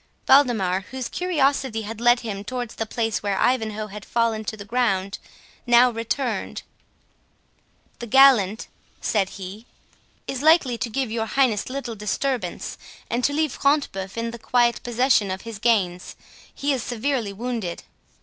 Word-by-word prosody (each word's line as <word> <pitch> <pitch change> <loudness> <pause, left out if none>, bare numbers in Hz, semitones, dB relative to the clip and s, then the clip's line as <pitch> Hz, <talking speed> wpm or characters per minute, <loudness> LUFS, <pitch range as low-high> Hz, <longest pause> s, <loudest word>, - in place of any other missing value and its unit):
Waldemar, 215 -9 +4
whose 260 -2 -4
curiosity 275 -9 0
had 225 +2 -7
led 240 0 +4
him 205 -4 -5
towards 245 +1 -5
the 225 - -4
place 225 -1 -1
where 200 -2 -1
Ivanhoe 220 -4 0
had 210 0 -9
fallen 230 -1 0
to 220 - -4
the 200 - -9
ground, 200 -4 0 0.5
now 240 +1 +6
returned. 235 +3 -3 1.4
"The 235 - -6
gallant," 235 -5 +5 0.3
said 195 -4 0
he, 200 +4 -9 0.6
"is 270 -1 -4
likely 310 -5 +4
to 245 - -2
give 260 0 -2
your 225 -1 -2
Highness 245 -5 +1
little 265 -3 -4
disturbance, 210 -1 -3 0.3
and 240 +1 0
to 285 - +3
leave 305 0 0
Front 285 +3 +1
de 195 - -6
Bœuf 190 +3 -7
in 230 0 -2
the 235 - -9
quiet 240 +1 +2
possession 245 -3 +2
of 185 0 -4
his 230 -3 -8
gains—he 210 +6 -2
is 260 - -2
severely 240 -2 -2
wounded." 220 -4 -4
230 Hz, 150 wpm, -23 LUFS, 210-255 Hz, 1.4 s, now